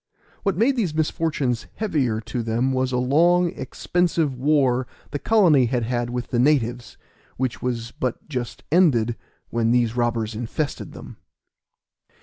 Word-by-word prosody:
What 195 -4 0
made 255 +6 +3
these 180 -10 0
misfortunes 150 -6 -1
heavier 140 - 0
to 115 +2 -4
them 115 +4 0
was 130 0 0
a 125 - 0
long, 170 +7 +3
expensive 170 -6 -1
war 130 -2 +2 0.2
the 145 - -3
colony 165 - +4
had 120 -1 0
had 120 +1 -1
with 125 0 -4
the 120 - 0
natives, 125 -3 +1 0.4
which 130 -1 -2
was 115 -2 -3
but 125 -2 -4
just 125 -6 -5
ended 125 -10 +3 0.4
when 115 -1 +1
these 120 -1 +2
robbers 120 -2 0
infested 120 +6 -4
them. - - -11
130 Hz, 140 wpm, -23 LUFS, 120-155 Hz, 0.4 s, colony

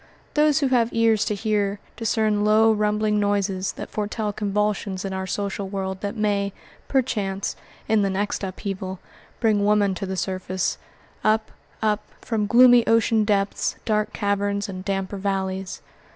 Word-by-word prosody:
Those 300 0 +3
who 275 - +2
have 240 -3 +2
ears 225 -2 +3
to 210 - -1
hear 205 -1 0 0.2
discern 215 -2 +1
low, 215 +1 +5
rumbling 210 0 +1
noises 200 -2 0
that - - -8
foretell 210 0 -2
convulsions 205 -2 -1
in 195 - -3
our 190 0 -3
social 200 0 -3
world 190 -1 -4
that 200 -1 -3
may, 200 -2 0 0.3
perchance, 205 -7 -1 0.3
in 220 -1 +3
the 200 - +1
next 200 +2 -2
upheaval, 190 0 -4 0.4
bring 215 -3 +2
woman 205 -1 +3
to 190 +1 -4
the 190 0 -3
surface; 185 0 -2 0.4
up, 220 0 +2 0.3
up, 210 -1 +2 0.2
from 215 -3 -1
gloomy 245 +1 +7
ocean 225 -1 +3
depths, 200 -1 0
dark 215 -2 +1
caverns, 200 0 -1
and 185 -2 -6
damper 195 0 -2
valleys. 190 -1 -3
205 Hz, 150 wpm, -24 LUFS, 195-215 Hz, 0.4 s, gloomy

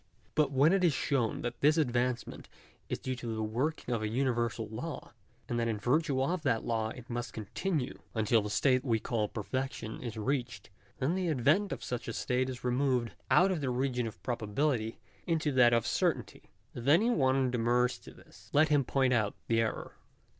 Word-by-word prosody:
But 150 -2 +2
when 140 +6 +4
it 195 -1 +2
is 170 -4 +4
shown 130 -4 0
that 120 0 -4
this 150 +3 +4
advancement 125 -4 -1 0.4
is - - -1
due 130 - -4
to 115 -2 -4
the 110 - -2
working 125 +5 -2
of 115 - -1
a 110 - -1
universal 120 -2 0
law; 125 +9 -6 0.3
and 120 - -1
that 115 - 0
in 110 -2 -1
virtue 135 +4 +1
of 175 +4 -1
that 125 -7 +1
law 110 -1 0
it 125 +1 -10
must 120 -2 -4
continue 135 - -3 0.2
until 110 +1 +3
the 105 - -4
state 130 +4 +2
we 115 -5 +1
call 110 -1 -1
perfection 120 +1 -4
is 115 -3 -5
reached, 120 -3 -3 0.3
then 135 +6 0
the 185 -2 -1
advent 155 - +2
of - - -4
such 125 -1 -4
a 115 - -3
state 130 +3 0
is 130 -1 -7
removed 125 -1 +1 0.2
out 190 +2 +5
of 175 -5 -1
the 135 - -1
region 125 -1 0
of 110 - -10
probability 115 0 -1 0.3
into 160 -3 +1
that 125 -3 +5
of 115 -2 +2
certainty. - - -1 0.2
If 120 +1 -6
any 200 +12 +5
one 130 - +2
demurs 125 +1 +1
to - - -13
this, - - -18
let 155 +1 +5
him 145 -2 +4
point 130 0 +2
out 110 -4 +1
the 115 0 +2
error. 110 - -3
125 Hz, 195 wpm, -31 LUFS, 115-140 Hz, 0.4 s, out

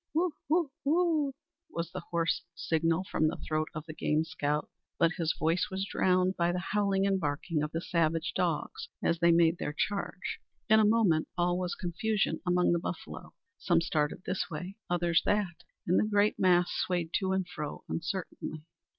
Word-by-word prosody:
"Woo, 340 0 +2 0.2
woo, 320 -2 +2
woo!" 310 -2 +2 0.4
was 170 0 -4
the 185 - -4
hoarse 170 -1 0
signal 165 +1 +1
from 155 -4 +1
the 160 - -2
throat 155 0 0
of 155 0 -5
the 155 - -7
game 155 0 +1
scout; 150 -3 -1 0.3
but 165 - +4
his 165 -3 0
voice 165 +3 +1
was 190 +1 -2
drowned 185 -1 +2
by 170 0 +2
the 180 - -2
howling 200 -2 +2
and 195 -1 +2
barking 150 0 -1
of 150 +1 -2
the 165 - -2
savage 165 -2 0
dogs - - -1
as 170 - +1
they 170 0 +5
made 165 0 +4
their 150 - -3
charge. 200 -2 -2 0.3
In 220 0 +6
a 215 - +5
moment 205 -8 +3
all 175 0 +2
was 180 -1 -2
confusion 200 +4 -1
among 180 0 +3
the 170 - +2
buffalo. - - -7 0.2
Some 175 -3 +3
started 155 0 -1
this 185 -1 -2
way, 180 +4 -6
others 175 -1 +2
that, 205 -5 +1 0.3
and 180 - +3
the 215 - +1
great 205 0 +2
mass 180 -2 +4
swayed 175 -3 -1
to 190 -1 -1
and 190 -1 0
fro 150 -4 -6
uncertainly. 165 -3 -4
175 Hz, 180 wpm, -30 LUFS, 165-195 Hz, 0.4 s, In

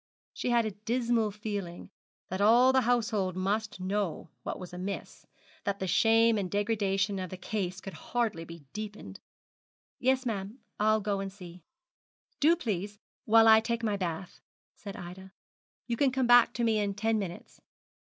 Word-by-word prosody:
She - - -3
had 235 -1 +3
a 215 - -2
dismal 230 +1 0
feeling 205 -4 -6 0.4
that 185 +2 -3
all 240 +5 +6
the 260 - +4
household 220 -6 +1
must 205 +2 -1
know 190 -2 -2
what - - -4
was 180 -1 -9
amiss, 185 +3 -6 0.4
that 200 -1 -1
the 190 - -3
shame 225 +3 +4
and 190 -2 -3
degradation 200 -1 0
of 185 -1 -4
the 185 - -7
case 185 -1 -3
could 195 0 -8
hardly 225 -9 -2
be 170 -2 -11
deepened. 210 - -7 0.8
'Yes, 260 +1 +2
ma'am; 205 0 -3 0.2
I'll 215 +1 +3
go 200 -1 -1
and 195 0 -4
see.' 180 -2 -12 0.8
'Do, 320 +4 +5
please, 210 - -3 0.3
while 225 +1 +6
I 220 0 +8
take 235 +1 -2
my 210 -2 +1
bath,' 175 -2 -5 0.3
said 200 -2 -9
Ida. 190 +2 -10 0.5
'You 235 -1 -2
can 275 0 +3
come 260 0 +1
back 245 0 +7
to 235 - -2
me 225 -2 +2
in 200 -1 -1
ten 220 +1 +1
minutes.' 180 -4 -7
210 Hz, 165 wpm, -30 LUFS, 190-225 Hz, 0.8 s, I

